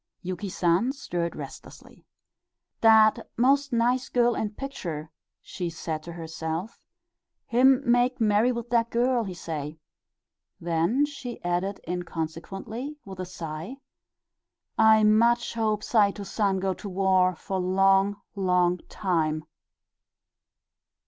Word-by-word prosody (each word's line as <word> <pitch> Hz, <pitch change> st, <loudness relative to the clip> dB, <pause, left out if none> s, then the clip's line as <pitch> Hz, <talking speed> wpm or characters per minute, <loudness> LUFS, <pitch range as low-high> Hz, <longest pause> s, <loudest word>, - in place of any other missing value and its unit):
Yuki 185 Hz, +2 st, -4 dB
San 180 Hz, +6 st, +1 dB
stirred 175 Hz, -11 st, -4 dB
restlessly. -, -, -11 dB, 0.7 s
"Dat 220 Hz, 0 st, +5 dB
most 275 Hz, +4 st, +3 dB
nice 245 Hz, +2 st, +1 dB
girl 240 Hz, -1 st, +3 dB
in 220 Hz, -, -2 dB
picture," 170 Hz, -, -6 dB, 0.3 s
she 175 Hz, -2 st, -5 dB
said 160 Hz, -1 st, -5 dB
to 170 Hz, +2 st, -9 dB
herself. 165 Hz, +3 st, -5 dB, 0.7 s
"Him 260 Hz, +3 st, +4 dB
make 245 Hz, +1 st, +2 dB
marry 220 Hz, +2 st, +3 dB
with 235 Hz, -1 st, -5 dB
dat 235 Hz, -1 st, +2 dB
girl, 240 Hz, 0 st, +1 dB
he 185 Hz, -2 st, -6 dB
say." 155 Hz, -2 st, -5 dB, 0.8 s
Then 170 Hz, -, +1 dB
she 265 Hz, -5 st, -7 dB
added 180 Hz, +3 st, -1 dB
inconsequently, 180 Hz, -, -5 dB
with 190 Hz, -2 st, -9 dB
a 185 Hz, -, -4 dB
sigh, 165 Hz, +4 st, -6 dB, 1.0 s
"I 220 Hz, -1 st, +5 dB
much 235 Hz, +3 st, +3 dB
hope 215 Hz, -2 st, 0 dB
Saito 205 Hz, -2 st, +2 dB
San 200 Hz, -1 st, 0 dB
go 190 Hz, 0 st, 0 dB
to 200 Hz, -, -8 dB
war 185 Hz, -1 st, +2 dB
for 190 Hz, +3 st, -4 dB
long, 195 Hz, +2 st, +3 dB
long 180 Hz, -2 st, +2 dB
time." 155 Hz, -5 st, -1 dB
200 Hz, 115 wpm, -26 LUFS, 175-235 Hz, 1.0 s, Dat